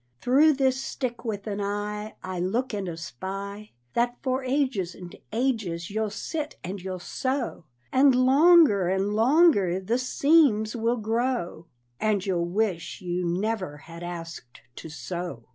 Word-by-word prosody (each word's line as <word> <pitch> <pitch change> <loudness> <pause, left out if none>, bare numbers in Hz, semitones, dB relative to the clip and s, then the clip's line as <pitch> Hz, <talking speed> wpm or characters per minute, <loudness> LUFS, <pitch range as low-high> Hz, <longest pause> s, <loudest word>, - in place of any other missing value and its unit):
Through 290 +5 +5
this 265 -1 +1
stick 250 -4 -4
with 210 -4 -4
an 205 -1 -3
eye 210 +1 -3
I 185 -1 -4
look 230 +8 -1
and 200 -3 -3
espy 195 - -6 0.2
That 240 +1 +1
for 260 0 0
ages 255 -9 0
and 180 -2 -10 0.2
ages 215 -8 -1
you'll 220 +1 -1
sit 300 +8 -4
and 185 +2 -5
you'll 185 0 -4
sew, 260 - -3 0.3
And 265 0 +5
longer 270 - +6
and 190 +2 0
longer 225 - +4
the 225 +6 -1
seams 255 -5 +3
will 235 +1 0
grow, 225 -6 -2 0.3
And 210 -3 +1
you'll 175 -3 0
wish 190 -3 -1
you 180 0 -2
never 185 -2 -2
had 165 +3 -12
asked 165 -7 -8 0.2
to 160 - -8
sew. 160 -3 -6
210 Hz, 145 wpm, -26 LUFS, 180-255 Hz, 0.3 s, longer